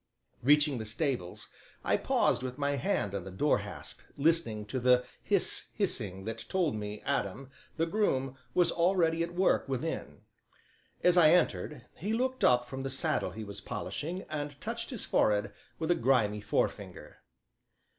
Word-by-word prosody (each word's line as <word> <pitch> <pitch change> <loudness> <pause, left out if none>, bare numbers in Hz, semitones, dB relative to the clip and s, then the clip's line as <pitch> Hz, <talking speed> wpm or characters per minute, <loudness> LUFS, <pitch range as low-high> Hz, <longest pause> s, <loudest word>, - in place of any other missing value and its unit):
Reaching 145 0 +4
the 110 - -4
stables, 115 - -2 0.4
I - - +2
paused - - +2
with 130 0 -5
my 145 -1 0
hand 110 -7 -1
on 100 -3 -3
the 95 - -8
door 105 +11 +2
hasp, - - -8 0.2
listening 140 -9 +1
to 130 +5 -3
the 125 0 +4 0.2
hiss, - - +1
hissing 95 -1 -2
that 115 0 -4
told 175 -9 +1
me 105 0 -5
Adam, 125 +7 -2 0.3
the 165 - +2
groom, 135 -9 0 0.2
was 175 -2 +5
already 170 -2 +2
at 170 +1 -3
work 185 -6 +2
within. 135 +5 -3 0.8
As 180 0 +6
I 155 -3 +7
entered 150 -6 +1
he 205 +6 -2
looked 255 +2 -1
up 125 -1 +5
from 130 +2 -6
the 135 - -3
saddle 155 +3 0
he 110 - -7
was 100 -1 -7
polishing 175 +5 -4
and 145 -2 -5
touched 230 +5 -4
his 245 -6 -2
forehead 105 -1 +2 0.2
with 160 +1 0
a 175 - +1
grimy 110 -5 +2
forefinger. - - -2
135 Hz, 160 wpm, -31 LUFS, 115-165 Hz, 0.8 s, I